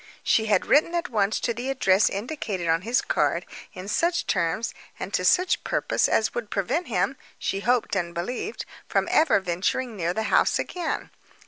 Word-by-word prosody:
She 220 -1 +2
had 205 -3 +2
written 320 +4 +3
at 345 +1 -1
once 210 -1 +1
to 235 - 0
the 245 +4 -4
address 200 -7 +3
indicated 205 - -4
on 165 +1 +2
his 235 +5 +1
card, - - 0 0.3
in 185 +1 -7
such 340 - +1
terms 170 +8 0 0.3
and - - -6
to - - +1
such 365 0 +3
purpose - - +1
as 220 - +2
would 235 -3 -4
prevent 265 - -1
him, 230 +5 0 0.2
she 195 - -2
hoped 240 0 +1
and 175 -3 -1
believed, 245 - -4 0.2
from - - +1
ever 310 -9 +4
venturing 190 +7 -2
near 175 -3 -1
the 220 - 0
house - - +4
again. 350 -3 -3
220 Hz, 180 wpm, -25 LUFS, 190-270 Hz, 0.3 s, ever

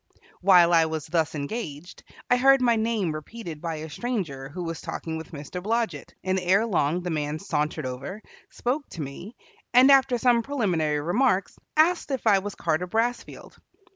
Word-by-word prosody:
While 180 -2 +6
I 165 -1 +5
was 160 -1 -4
thus 160 -1 0
engaged, 150 0 -6 0.3
I 245 - +4
heard 270 +2 +5
my 240 -2 +3
name 220 -6 0
repeated 155 +1 -7
by 165 -2 -3
a 155 +1 -7
stranger 155 - -4
who 175 +5 -6
was 165 -1 -5
talking 160 -1 -5
with 160 0 -8
Mr. 155 +4 -7
Blodget, 220 - -2
and 190 0 0
erelong 180 -3 +1
the 180 - -3
man 150 -1 -2
sauntered 150 -5 -2
over, 130 +12 -6 0.3
spoke 275 +4 -3
to 165 - -7
me, 170 - -9 0.4
and 260 +3 +8
after 265 -2 +5
some 240 0 +3
preliminary 180 - 0
remarks 195 - +1 0.2
asked 335 +2 +3
if 265 -4 -3
I 205 -3 +5
was 205 +1 -6
Carter 170 +2 -1
Brassfield. 230 +5 -3
180 Hz, 170 wpm, -25 LUFS, 155-235 Hz, 0.4 s, and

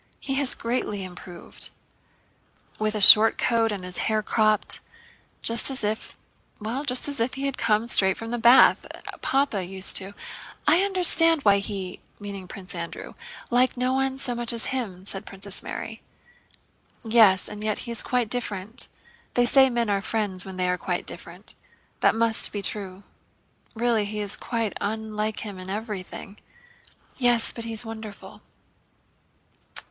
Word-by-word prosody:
"He 270 - -4
has 270 -1 0
greatly 230 -4 -2
improved." 180 -1 -9 1.1
"With 215 0 -1
a 210 - -2
short 215 +3 +10
coat 230 -2 +1
and 200 -3 -5
his 180 0 -7
hair 215 -1 0
cropped; 215 -1 +1 0.6
just 230 +3 +4
as 265 -4 -3
if, 215 +1 -3 0.4
well, 230 +6 -4
just 255 -2 +2
as 285 -1 -4
if 230 +3 -1
he 275 0 -3
had 275 -1 -1
come 215 +1 +1
straight 190 -5 +2
from 225 0 -7
the 240 - -2
bath... 240 +3 +6 0.4
Papa 270 -8 0
used 190 +1 +1
to..." 195 +1 -6 0.5
"I 345 - +5
understand 345 -5 +5
why 200 -1 +5
he" 195 -2 -5 0.5
(Prince 185 0 -6
Andrew) 170 -1 -7 0.4
"liked 250 +1 +2
no 255 +1 0
one 265 0 0
so 260 -2 -2
much 240 -1 0
as 230 -1 -1
him," 195 -8 -4
said 195 -1 -2
Princess 195 0 -5
Mary. 225 0 -7 1.0
"Yes, 220 -5 +5
and 210 0 -6
yet 215 -1 -1
he 235 - -6
is 230 - -1
quite 250 -2 0
different. 220 -2 -2 0.5
They 245 - +4
say 265 +2 +6
men 235 -2 -1
are 200 -1 0
friends 200 -4 -2
when 190 -1 -8
they 180 0 0
are 180 0 0
quite - - -3
different. - - -5 0.5
That - - +3
must 225 0 +1
be 205 -1 -5
true. 195 -1 -5 0.7
Really 230 -2 +1
he 210 +1 -5
is 205 -1 -2
quite 230 -4 -3
unlike 215 0 -3
him—in 190 -3 -8
everything." 205 -1 -6 0.8
"Yes, 240 -2 +3
but 230 - -8
he's 230 0 -1
wonderful." 220 -2 -9
220 Hz, 155 wpm, -25 LUFS, 200-240 Hz, 1.1 s, short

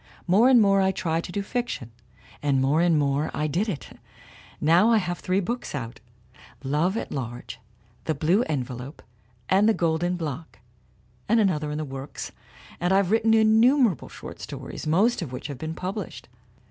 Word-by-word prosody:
More 205 +8 +5
and 255 -2 +7
more 195 -2 +4
I 190 0 +3
tried 170 -3 -2
to - - -7
do 200 +2 -2
fiction, 210 - -4 0.5
and 140 -2 +2
more 140 +5 +2
and 170 -2 +3
more 145 +1 +1
I 150 - -1
did 175 +9 0
it: 160 -8 -7 0.6
now 170 +8 +4
I 230 - +5
have 175 -3 -2
three 185 +1 0
books 235 -1 -3
out 115 -4 -6 0.6
Love 155 +9 0
at - - -4
Large, 120 -3 -6 0.5
The 155 - 0
Blue 165 +9 +2
Envelope 130 0 -4 0.4
and 200 +3 +4
The 220 - +3
Golden 170 +2 0
Block 160 -1 -6 0.7
and 230 - +4
an 200 -3 +4
other 150 -2 -3
in 150 - -3
the 155 - -3
works, 135 0 -7 0.5
and 175 +1 0
I've 195 -1 +3
written 225 0 +4
innumerable 220 - +4
short - - -10
stories, - - -7
most 200 +10 +3
of 155 -7 -5
which 125 - -7
have 140 -3 -6
been 160 +1 -4
published. 190 +5 -5
175 Hz, 175 wpm, -25 LUFS, 150-205 Hz, 0.7 s, and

